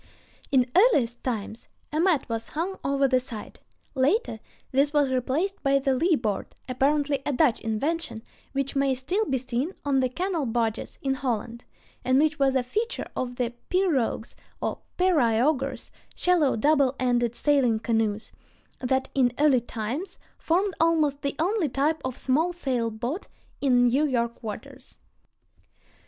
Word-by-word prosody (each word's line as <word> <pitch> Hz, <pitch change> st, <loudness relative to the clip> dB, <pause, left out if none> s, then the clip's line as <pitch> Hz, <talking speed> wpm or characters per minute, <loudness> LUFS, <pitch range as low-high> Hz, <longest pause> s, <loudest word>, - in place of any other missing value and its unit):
In 255 Hz, -2 st, +3 dB
earliest 290 Hz, -, +3 dB
times, 225 Hz, -2 st, -4 dB, 0.2 s
a 305 Hz, -, -1 dB
mat 345 Hz, -4 st, +2 dB
was 230 Hz, -1 st, -4 dB
hung 350 Hz, +5 st, -3 dB
over 275 Hz, 0 st, +2 dB
the 255 Hz, -1 st, +3 dB
side. 240 Hz, -4 st, -8 dB, 0.3 s
Later 270 Hz, -, +1 dB, 0.3 s
this 275 Hz, +2 st, +3 dB
was 290 Hz, -3 st, +3 dB
replaced 280 Hz, +10 st, -1 dB
by 275 Hz, -1 st, +3 dB
the 275 Hz, 0 st, +1 dB
leeboard, 255 Hz, -, +1 dB, 0.2 s
apparently 280 Hz, +2 st, +1 dB
a -, -, -1 dB
Dutch 270 Hz, -3 st, +3 dB
invention, 225 Hz, +3 st, -2 dB, 0.3 s
which 275 Hz, 0 st, -2 dB
may 275 Hz, -1 st, +2 dB
still 360 Hz, +12 st, -1 dB
be 270 Hz, -8 st, 0 dB
seen 255 Hz, +7 st, -3 dB
on 275 Hz, -2 st, +2 dB
the 255 Hz, -1 st, +1 dB
canal 345 Hz, 0 st, -2 dB
barges 225 Hz, -1 st, -2 dB
in 270 Hz, -1 st, +1 dB
Holland, 235 Hz, -3 st, -3 dB, 0.4 s
and 255 Hz, +1 st, +3 dB
which 310 Hz, +1 st, +2 dB
was 270 Hz, -1 st, +3 dB
a 260 Hz, -, +2 dB
feature 435 Hz, -, -2 dB
of 250 Hz, -1 st, -3 dB
the 245 Hz, -1 st, -2 dB, 0.2 s
pirogues 315 Hz, -12 st, 0 dB, 0.3 s
or -, -, -3 dB, 0.2 s
periaugers 275 Hz, -5 st, +1 dB, 0.2 s
(shallow 345 Hz, -6 st, +3 dB
double 275 Hz, +2 st, +3 dB
ended 240 Hz, -2 st, +1 dB
sailing 270 Hz, -6 st, +2 dB
canoes) 220 Hz, -1 st, -1 dB, 0.5 s
that 265 Hz, +1 st, 0 dB
in 255 Hz, -3 st, +3 dB
early 285 Hz, -4 st, +4 dB
times 250 Hz, -, -5 dB, 0.2 s
formed 370 Hz, +4 st, +1 dB
almost 310 Hz, -4 st, +2 dB
the 280 Hz, -1 st, -2 dB
only 355 Hz, 0 st, +1 dB
type 290 Hz, +4 st, 0 dB
of 260 Hz, -1 st, -4 dB
small 315 Hz, +7 st, +1 dB
sail 255 Hz, -9 st, -1 dB
boat 240 Hz, -, -4 dB, 0.3 s
in 250 Hz, -3 st, +4 dB
New 270 Hz, +5 st, +3 dB
York 235 Hz, -3 st, -1 dB
waters. 215 Hz, -3 st, -8 dB
270 Hz, 145 wpm, -26 LUFS, 245-310 Hz, 0.5 s, early